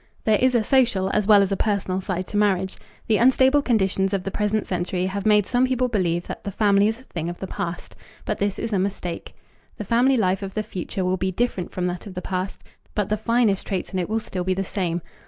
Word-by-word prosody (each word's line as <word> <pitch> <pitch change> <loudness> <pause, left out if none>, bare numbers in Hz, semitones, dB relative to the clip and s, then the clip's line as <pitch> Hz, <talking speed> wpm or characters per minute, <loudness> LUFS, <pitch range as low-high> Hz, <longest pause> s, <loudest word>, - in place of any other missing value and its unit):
There 215 -2 +3
is 255 -1 +3
a 230 - +3
social 230 -8 +2
as 210 -1 +1
well 205 -2 +7
as 195 - -2
a - - +2
personal 195 -3 -1
side 185 -1 -3
to - - -7
marriage. 190 -2 +1 0.3
The 220 - +2
unstable 260 +3 +4
conditions 195 -6 +1
of 190 - -3
the 195 - -4
present 210 +1 0
century 180 0 -2
have 195 +2 -2
made 210 -2 +5
some 250 +3 +2
people 255 -1 0
believe 175 -6 0
that - - -7
the - - -3
family 200 0 +3
is 225 +2 -2
a - - -16
thing 170 -9 -5
of 175 - -6
the - - -5
past, 175 -2 -5 0.3
but 215 - -2
this 200 -1 0
is 230 -1 -3
a 195 - +2
mistake. 185 -3 -4 0.4
The 210 - -5
family 250 +5 +3
life 190 -2 +1
of 195 -1 -6
the 215 - 0
future 190 -2 -4
will 185 +1 +1
be 190 +1 -1
different 190 -3 -2
from 180 - -2
that 180 +3 -4
of 190 - -9
the 180 - -4
past, 185 +1 -4 0.3
but 210 -3 0
the 215 - +2
finest 220 -2 +1
traits 190 -1 -3
in 185 - 0
it 180 - -2
will 220 +1 +1
still 185 -4 -4
be 185 +1 0
the 195 - -1
same. 175 -3 -2
200 Hz, 250 wpm, -23 LUFS, 185-220 Hz, 0.4 s, well